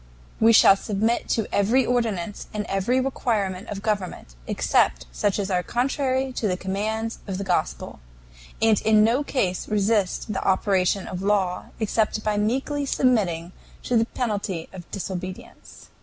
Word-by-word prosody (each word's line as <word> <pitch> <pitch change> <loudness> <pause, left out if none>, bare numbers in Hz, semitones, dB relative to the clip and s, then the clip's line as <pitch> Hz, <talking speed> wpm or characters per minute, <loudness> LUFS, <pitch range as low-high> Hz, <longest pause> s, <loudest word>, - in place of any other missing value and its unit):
We 225 +1 +6
shall 215 -3 +7
submit 215 +4 -1
to 225 - +1
every 230 +6 +3
ordinance 220 -6 -1
and 210 0 -2
every 205 +7 +1
requirement 220 -7 -1
of 200 0 -6
government, 200 - -3
except - - +1
such 200 - 0
as 200 -1 -2
are 180 -1 +2
contrary 260 +3 -1
to 220 - 0
the 180 -2 0
commands 215 +4 -3
of 190 -2 -3
the 200 - -3
Gospel, 185 -2 -2 0.6
and 220 -2 +3
in 215 -1 +5
no 240 +6 +2
case 190 -11 -1
resist 210 0 0
the 190 - -2
operation 190 0 +1
of 180 0 -5
law, 195 -3 0
except 215 0 0
by 215 -1 0
meekly 265 +7 0
submitting 190 -12 +1 0.3
to 245 - -1
the 225 0 +4
penalty 205 -8 -3
of 180 -3 -10
disobedience. 185 -1 -7
210 Hz, 150 wpm, -24 LUFS, 190-230 Hz, 0.6 s, shall